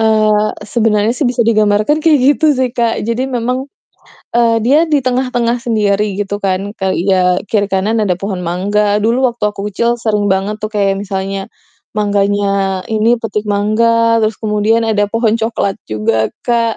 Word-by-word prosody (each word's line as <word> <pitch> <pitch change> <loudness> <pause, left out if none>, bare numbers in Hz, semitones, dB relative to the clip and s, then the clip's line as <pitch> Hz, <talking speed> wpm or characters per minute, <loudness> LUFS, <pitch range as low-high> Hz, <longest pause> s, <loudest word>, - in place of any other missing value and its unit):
Eee, 215 -1 +3 0.2
sebenarnya 220 -1 +2
sih 250 0 0
bisa 245 -1 0
digambarkan 215 +5 +2
kayak 310 -2 +4
gitu 305 +2 +2
sih 255 -1 0
Kak. 235 -3 -1
Jadi 235 +2 -1
memang, 250 +2 -2 0.7
eee, 230 -1 +3
dia 280 +5 +4
di 305 -3 +1
tengah-tengah 250 -2 0
sendiri 210 -3 +1
gitu 205 0 -2
kan, 185 -1 +1 0.2
kayak, 190 -1 -1
ya, 190 -1 +3 0.3
kiri 205 -2 +1
kanan 195 +4 0
ada 185 -3 +1
pohon 195 -3 -4
mangga. 205 +4 0
Dulu 230 +4 +1
waktu 235 -2 -5
aku 205 - -9
kecil 235 +4 0
sering 210 -3 -1
banget 195 +3 -1
tuh 215 - -3
kayak 195 -1 +1
misalnya 195 -1 -4 0.5
mangganya 200 -2 0
ini, 225 +2 +2
petik 210 -2 -4
mangga, 230 +3 +2
terus 215 0 0
kemudian 215 +1 +1
ada 210 -2 +1
pohon 225 -1 +1
coklat 220 -3 -1
juga 110 +1 0 0.2
kak. 230 -2 +1
215 Hz, 160 wpm, -14 LUFS, 200-235 Hz, 0.7 s, kayak